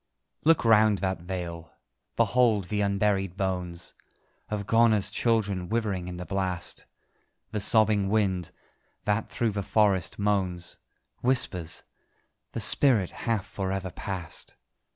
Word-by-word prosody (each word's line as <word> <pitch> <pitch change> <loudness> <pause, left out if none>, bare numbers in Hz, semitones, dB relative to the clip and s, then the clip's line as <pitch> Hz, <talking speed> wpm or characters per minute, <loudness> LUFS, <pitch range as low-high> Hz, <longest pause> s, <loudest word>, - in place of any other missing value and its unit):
Look 160 -4 +4
round 110 -2 +5
that 95 -2 -2
vale: 85 -2 -6 0.4
behold 110 -3 +2
the 105 -1 0
unburied 100 -2 0
bones 90 -3 -3 0.6
Of 105 -1 -3
Ghona's 110 -2 +3
children 105 -6 0
withering 105 -6 -1
in 90 -1 -6
the 90 - -6
blast: 95 -2 -3 0.6
The 105 - -2
sobbing 105 -1 +3
wind, 95 -5 +1 0.6
that 105 +2 0
through 115 -2 0
the 100 0 -2
forest 100 -3 +2
moans, 95 -4 -1 0.4
Whispers 95 -10 0 0.7
"The - - -3
spirit 115 -10 +4
hath 115 -5 -2
for 95 -1 -4
ever 95 -1 -3
passed!" 90 -4 -6
100 Hz, 120 wpm, -27 LUFS, 90-110 Hz, 0.7 s, round